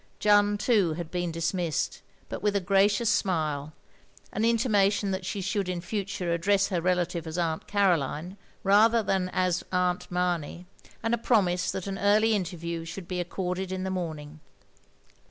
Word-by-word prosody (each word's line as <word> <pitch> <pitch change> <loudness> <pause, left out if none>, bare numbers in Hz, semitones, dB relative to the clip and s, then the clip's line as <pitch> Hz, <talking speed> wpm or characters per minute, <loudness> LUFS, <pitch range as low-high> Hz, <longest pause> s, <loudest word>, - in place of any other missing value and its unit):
Jeanne, 205 0 +4
too, 205 -7 +2
had 165 0 -6
been 175 -1 -2
dismissed 165 -1 -2
— - - -29
^but - - -4
with 205 -1 +1
a - - +3
gracious 200 +4 +2
smile, 155 -7 0 0.6
an 215 - -1
intimation 210 -4 +2
that 190 -1 -3
she 200 0 -3
should 195 0 -1
in 180 -1 -2
futtire 185 -2 -3
address 195 +4 +2
her 180 -4 -1
relative 175 -2 0
as 160 +2 -5
Aunt 165 -2 -1
Caroline, 180 -3 0 0.3
rather 220 +3 +5
than 190 -2 0
as 185 -1 +1
Atmt 180 -1 0
Mamey 180 -1 -2 0.2
— - - -24
and 225 +1 0
a 235 - +1
promise 185 -7 +2
that 190 - -3
an 195 -1 -4
early 215 +2 +4
interview 170 -4 -3
should 170 +2 -8
be 180 -1 -3
accorded 180 +1 -3
in 185 0 -3
the 190 - -2
morning. 155 -4 -5
185 Hz, 170 wpm, -27 LUFS, 170-200 Hz, 0.6 s, rather